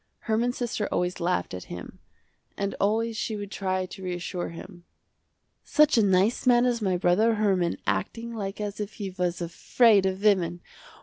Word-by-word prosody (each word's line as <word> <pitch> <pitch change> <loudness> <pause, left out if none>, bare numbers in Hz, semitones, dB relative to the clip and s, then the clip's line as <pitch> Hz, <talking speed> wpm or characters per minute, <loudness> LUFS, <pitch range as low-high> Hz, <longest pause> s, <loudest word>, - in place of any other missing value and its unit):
Herman's 235 +2 0
sister 230 -4 -2
always 180 +1 -1
laughed 170 - -1
at 90 - -6
him 90 - -9 0.6
and 200 0 -2
always 225 +3 +1
she 220 0 -2
would 205 -1 -6
try 185 -1 -1
to 190 +1 -10
reassure 180 0 -4
him. 175 +1 -11 0.8
"Such 300 -1 +4
a 230 - +5
nice 200 +5 +2
man 245 0 +5
as 240 -2 0
my 190 -3 +1
brother 205 +6 +3
Herman 190 -5 +1
acting 230 - -2
like 200 -2 -5
as 205 -1 -4
if 210 0 -4
he 200 -3 -5
was 180 -1 -2
afraid 200 +4 +3
of 190 +1 -3
women. 175 -4 +2
195 Hz, 170 wpm, -26 LUFS, 180-220 Hz, 0.8 s, a